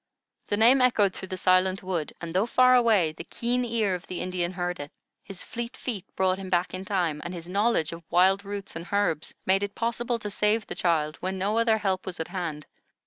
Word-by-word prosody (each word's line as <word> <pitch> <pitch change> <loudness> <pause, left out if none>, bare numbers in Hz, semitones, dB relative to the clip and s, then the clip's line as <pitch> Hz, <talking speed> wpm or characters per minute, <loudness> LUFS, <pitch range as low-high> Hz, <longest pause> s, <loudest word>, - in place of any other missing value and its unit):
The 205 - 0
name 245 +5 +6
echoed 210 -6 +3
through 190 - -8
the 185 -1 -5
silent 185 +1 +2
wood, 175 -5 -2
and, 170 -1 -6
though 190 +5 +2
far 255 +1 +5
away, 220 -10 +4
the 155 - -9
keen 245 +1 -1
ear 225 -5 0
of 180 - -5
the 180 - -5
Indian 180 -1 -2
heard 180 0 -3
it, 145 0 -6 0.3
his 195 -2 -8
fleet 235 +1 -6
feet 210 -7 -4
brought 190 0 +1
him 190 -1 -6
back 180 0 +1
in 185 +1 -5
time, 175 -6 -1
and 175 +1 -5
his 170 -1 -7
knowledge 200 -3 +1
of 165 - -8
wild 190 +3 +4
roots 200 -2 -6
and 170 +2 -6
herbs 200 -7 0
made 190 +1 +3
it 200 0 -4
possible 235 +1 -1
to 210 -2 -6
save 210 +1 +1
the - - -6
child 155 -3 0
when 190 +1 -3
no 205 +4 +1
other 230 -1 +3
help 195 -3 -1
was 180 -2 -5
at 160 - -4
hand. 170 -5 -4
190 Hz, 225 wpm, -27 LUFS, 175-220 Hz, 0.3 s, name